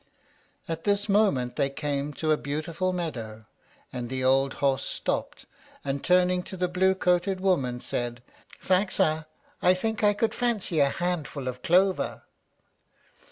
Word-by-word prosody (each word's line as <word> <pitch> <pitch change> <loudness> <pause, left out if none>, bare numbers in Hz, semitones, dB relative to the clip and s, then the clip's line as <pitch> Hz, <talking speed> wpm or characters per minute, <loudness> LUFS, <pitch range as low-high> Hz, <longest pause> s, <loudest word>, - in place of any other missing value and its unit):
At 165 0 -4
this 205 0 +1
moment 195 - +2
they 140 -2 +2
came 145 0 -3
to 155 +2 -1
a - - +5
beautiful 155 +6 -2
meadow, 115 -12 -5 0.5
and 120 -1 -4
the 130 0 -3
old 135 +1 +3
horse 135 -1 +1
stopped, - - -3 0.4
and, 140 0 -2
turning 180 0 +3
to 190 +1 -8
the 180 0 +1
blue 190 +1 +2
coated 180 +1 +1
woman, 140 -11 +1
said, 120 0 -4 0.4
"Faxa, 160 -5 +1 0.3
I 180 +1 +5
think 220 +3 -2
I 205 0 +4
could 220 +1 0
fancy 220 -9 -1
a 140 -1 +5
handful 155 -5 -3
of 125 0 -4
clover." 185 +2 +2
165 Hz, 145 wpm, -27 LUFS, 135-185 Hz, 0.5 s, a